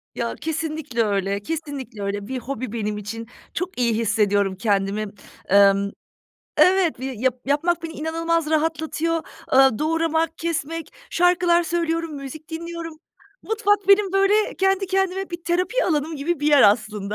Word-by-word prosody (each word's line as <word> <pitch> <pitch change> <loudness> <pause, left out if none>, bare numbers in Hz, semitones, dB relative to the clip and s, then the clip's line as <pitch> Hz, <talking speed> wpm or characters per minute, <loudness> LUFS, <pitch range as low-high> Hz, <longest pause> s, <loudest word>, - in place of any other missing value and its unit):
Ya, 235 0 -2
kesinlikle 310 -6 -2
öyle, 200 -1 0
kesinlikle 280 -4 -6
öyle. 200 0 -3
Bir 260 +1 -3
hobi 255 -1 -5
benim 210 -2 -2
için, 225 +2 -6 0.3
çok 360 -4 -4
iyi 235 -2 +2
hissediyorum 205 -3 +1
kendimi. 200 +1 0 0.5
Emm, 200 0 +5 0.7
evet, 365 -3 +4
yap 260 -1 -1
yapmak 330 +5 +1
beni 330 -1 -5
inanılmaz 330 0 -1
rahatlatıyor. 320 +1 0 0.4
Eee, 265 -3 +5
doğramak, 325 +1 0
kesmek, 330 -1 -3 0.2
şarkılar 350 -1 +3
söylüyorum, 330 -1 -1
müzik 280 +2 -8
dinliyorum. 335 0 -6 0.5
Mutfak 410 -3 +1
benim, 395 -1 +5
böyle, 395 +2 +3
kendi 385 0 +1
kendime 385 0 -1
bir 345 -1 -6
terapi 365 +8 +1
alanım 310 -1 0
gibi 300 +2 -2
bir 295 - 0
yer 290 -2 +6
aslında. 210 -1 +2
310 Hz, 135 wpm, -23 LUFS, 230-340 Hz, 0.7 s, yer